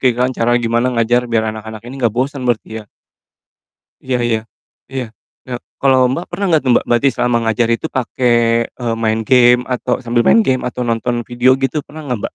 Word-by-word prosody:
gimana 125 0 +1
cara 115 +1 +1
gimana 120 +2 +1
ngajar 120 +2 +3
biar 115 -1 +1
anak-anak 110 0 -8
ini 125 - -8
gak 110 -1 +1
bosen 135 +2 -1
berarti 110 -1 -2
ya? 105 - -13 1.2
Iya 130 -1 0
iya, 115 -1 +1 0.5
iya 130 -3 -3 0.4
iya 125 - -5 0.3
kalo 135 -1 +4 0.2
Mbak 170 - -3
pernah 180 +3 -3
gak 155 - +3
Mbak - - +2
berarti 120 +3 +3
selama 120 -1 +1
ngajar 115 +1 +1
itu 115 +7 0
pake, 130 -3 -3 0.4
eee, 120 -2 -4
main 110 0 +1
game 125 0 +5
atau 125 0 -1
sambil 120 0 +1
main 230 - +6
game 130 -9 0
atau 125 - -5
nonton 120 +1 -1
video 120 +1 +2
gitu 145 +3 0
pernah 155 +2 -10
gak 140 - -8
Mbak? - - -9
120 Hz, 190 wpm, -16 LUFS, 115-130 Hz, 1.2 s, main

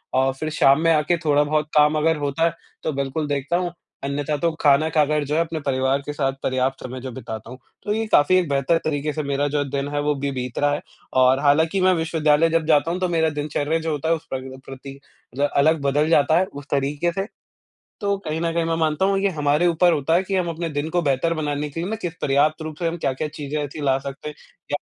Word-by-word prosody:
अ, 130 +1 +3
फिर 155 - -2
शाम 140 -2 +4
में 165 0 +3
आके 155 +3 +2
थोड़ा 145 -1 +4
बहुत 150 0 0
काम 150 +1 +5
अगर 160 +1 +2
होता 145 +2 -1
है 170 - +1 0.3
तो 160 - -1
बिल्कुल 140 +2 -2
देखता 145 +3 -1
हूँ। 175 -1 -2 0.3
अन्यथा 145 +2 -2
तो 170 +1 +1
खाना 145 +2 +4
खाकर 150 -1 +2
जो 150 +2 -2
है 165 - +3
अपने 165 -1 -3
परिवार 130 0 +1
के 145 - -4
साथ 135 -2 0
पर्याप्त 130 +1 -1
समय 130 0 -6
जो 130 0 -6
बिताता 115 -2 -7
हूँ। 125 - -9 0.3
तो 210 - -1
ये 225 +1 -1
काफ़ी 145 +6 +5
एक 180 - +1
बेहतर 140 +4 +2
तरीक़े 150 -1 -1
से 155 - -3
मेरा 140 +1 0
जो 145 +1 -1
है 140 -1 -2
दिन 140 0 -2
है 145 - 0
वो 150 0 +1
अभी 140 0 -2
बीत 125 -1 -5
रहा 145 0 +2
है - - -2 0.4
और 130 +1 +5
हालाँकि 160 +6 +2
मैं 185 0 +4
विश्वविद्यालय 160 -1 +2
जब 165 -1 +1
जाता 155 +1 +3
हूँ 180 - -2
तो 185 - +1
मेरा 160 -2 +2
दिनचर्या 150 +1 -1
जो 160 0 -3
होता 150 +2 -2
है 165 - +4
उस 160 - -10
पर 130 -1 -2
भी 130 0 -9
प्रति 135 +1 -9 0.4
जो 140 - -3
है 145 - +2
अलग 155 +1 +3
बदल 145 +3 +1
जाता 155 0 +4
है 190 - +3
उस 145 -5 -10
तरीक़े 145 +4 0
से। 195 +2 -3 0.8
तो 200 -1 0
कहीं 155 +1 -2
न 165 0 0
कहीं 170 -1 +1
मैं 165 0 0
मानता 160 +1 +1
हूँ 195 0 +2
ये 200 +1 +2
हमारे 150 +4 +2
ऊपर 175 +1 +4
होता 155 +1 +1
है 175 - +3
कि 195 0 -2
हम 180 -2 0
अपने 165 +1 -3
दिन 145 +2 -2
को 175 - +3
बेहतर 145 +4 +1
बनाने 150 -2 -2
के 165 +4 -5
लिए 180 - -3
ना 220 - -2
किस 175 -1 -3
पर्याप्त 150 +3 +2
रूप 155 -1 -6
से 170 -2 0
हम 165 - -3
क्या-क्या 145 0 -2
चीज़ें 150 0 -5
ऐसी 145 +2 -7
ला 135 -1 +2
सकते 140 +2 -7
हैं, 150 - -7 0.4
या - - +2
150 Hz, 260 wpm, -22 LUFS, 140-165 Hz, 0.8 s, काम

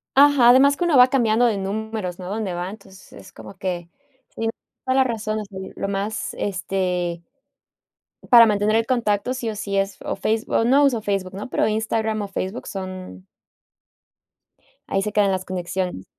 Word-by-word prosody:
Ajá, 275 -3 +6
además 275 +3 +6
que 350 - -2
uno 325 -6 +3
va 250 +1 +8
cambiando 240 -2 +2
de 220 -4 +1
números, 200 -2 -4
¿no?, 180 - -7
a - - -6
donde 205 -3 -3
va, 175 +1 -4
entonces 195 -2 -14
es 190 - -13
como 195 - -12
que 175 -2 -4 0.5
tienes 225 0 -1 0.3
toda 260 0 0
la 265 - +6
razón, 215 -2 -2
o 210 - -5
sea 195 -1 -11 0.2
lo 195 - -2
más, 200 +2 -3
este 180 -3 -2 1.1
para 235 -2 +9
mantener 210 0 +1
el 225 0 +2
contacto 235 -1 0
sí 235 -3 -3
o - - -5
sí, 200 -1 -4
es 195 0 -1
o - - -3
Face 220 +1 -1
no 260 +5 +3
uso 245 -5 +2
Facebook, 195 -3 -2
¿no?, 205 +5 -6
pero - - +1
Instagram 220 0 -1
o 200 - -5
Facebook 195 +3 -5
son 185 - -7 1.6
Ahí 195 - 0
se 210 +1 -2
quedan 205 -2 +3
las 185 0 -2
conexiones. 180 - -4
205 Hz, 180 wpm, -22 LUFS, 190-225 Hz, 1.6 s, para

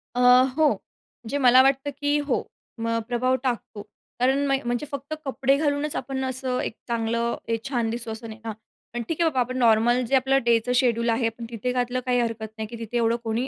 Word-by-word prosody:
अ, - - -1 0.4
हो. 315 -1 +5
म्हणजे 245 +4 -8
मला 255 -1 +7
वाटतं, 270 +1 +2
की 290 0 +2
हो. 260 - +1 0.4
म 230 0 0
प्रभाव 255 +1 +1
टाकतो. 235 -4 -3 0.4
कारण 265 +3 +2
म्ह 275 - +3
म्हणजे 240 +4 -1
फक्त 280 +2 -5
कपडे 270 0 +2
घालूनच 290 0 0
आपण 265 +1 -3
असं 260 -1 -2
एक - - -3
चांगलं, 235 0 -1
एक 230 -1 -2
छान 240 -4 0
दिसतो 230 0 -4
असं 225 +1 -7
नाही 220 0 -9
ना. 225 - -5
हां 215 - -5 0.4
पण - - -1
ठीक 330 +1 -2
आहे, 330 - +4
बाबा 265 -4 -2
आपण 255 +1 -1
नॉर्मल 240 +1 +4
जे 275 - +3
आपलं 265 +1 +3
डेचं 235 +1 +2
शेड्यूल 235 -2 +2
आहे, 230 0 +2
पण 230 +1 -9
तिथे 235 +2 -3
घातलं 250 0 -1
काही 250 -1 +2
हरकत 230 -2 -2
नाही, 220 -1 -4
की 235 +2 -8
तिथे 230 +1 -3
एवढं 230 0 +2
कोणी 230 +4 -1
245 Hz, 215 wpm, -25 LUFS, 230-265 Hz, 0.4 s, मला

